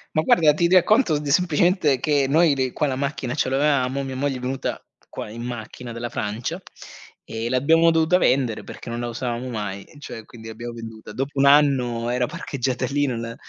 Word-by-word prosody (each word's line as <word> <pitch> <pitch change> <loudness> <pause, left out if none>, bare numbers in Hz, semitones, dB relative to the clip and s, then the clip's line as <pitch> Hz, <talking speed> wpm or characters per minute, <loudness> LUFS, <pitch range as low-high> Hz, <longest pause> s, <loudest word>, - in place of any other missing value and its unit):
Ma 155 - +4
guarda, 155 -1 +4
ti 170 +3 +1
racconto 185 - +4
d 150 - -7
semplicemente 175 -2 +2
che 145 0 +1
noi, 160 +1 +4
le 130 -2 -2
qua 150 - 0
la 130 -2 -2
macchina 135 -2 -3
ce - - 0
l'avevamo. 135 -1 +1
Mia 130 -1 -5
moglie 135 0 -1
è - - -7
venuta 130 +1 -4 0.2
qua - - -7
in 115 +2 -8
macchina 120 0 -7
dalla 115 +1 -5
Francia, 115 - -4 0.6
ehm, 115 +1 -4
l'abbiamo 160 +6 +4
dovuta 165 +2 +3
vendere 130 -9 +1
perché - - -9
non 120 0 -4
la 120 - -3
usavamo 120 +1 -4
mai. 105 -4 -5
Cioè, 115 -6 -9
quindi 110 -2 -11
abbiamo 115 +2 -7
venduta. 115 -1 -9
Dopo 135 +1 -4
1 140 - +4
anno 130 -5 +3
era 125 0 +1
parcheggiata 130 0 -3
lì, 145 +1 +1
non 120 -3 -3
la 115 0 -6
130 Hz, 195 wpm, -23 LUFS, 120-150 Hz, 0.6 s, Ma